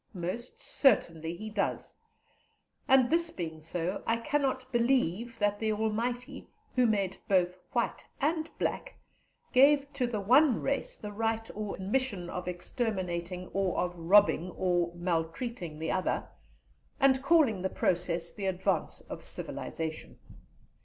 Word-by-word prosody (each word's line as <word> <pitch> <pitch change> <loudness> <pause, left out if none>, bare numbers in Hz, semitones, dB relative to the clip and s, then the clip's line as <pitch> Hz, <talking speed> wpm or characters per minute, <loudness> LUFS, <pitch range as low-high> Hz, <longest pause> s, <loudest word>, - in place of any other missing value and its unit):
Most 185 +8 -5
certainly 165 - +2
he 215 +4 -7
does; 205 -1 -2 0.9
and 260 -1 +5
this 335 0 +2
being 160 - -6
so, 170 +4 -3
I 230 - +3
cannot 260 0 -1
believe 235 -3 +1
that 205 -1 +1
the 220 -1 0
Almighty, 230 +3 -2 0.3
who 250 -2 +4
made 195 -3 0
both 180 -2 +3 0.2
white - - 0 0.2
and 315 +2 0
black, - - -2 0.6
gave 280 +2 +5
to 260 -3 0
the 225 -3 -2
one 250 +5 +5
race 275 0 -2
the 210 - -7
right 225 +1 -1
or 210 -1 -4
mission 195 -3 -1
of 180 0 -5
exterminating 180 -2 -3
or 195 -2 0
of 180 0 0
robbing 180 0 +4
or 175 -2 +1
maltreating 175 - -2
the 160 +1 -2
other, 185 - -1 0.7
and 265 -1 +4
calling 275 - +4
the 190 - 0
process 175 -2 0
the 200 -2 -3
advance 190 -1 -1
of - - -9
civilization. 160 -1 -5
205 Hz, 130 wpm, -30 LUFS, 180-250 Hz, 0.9 s, and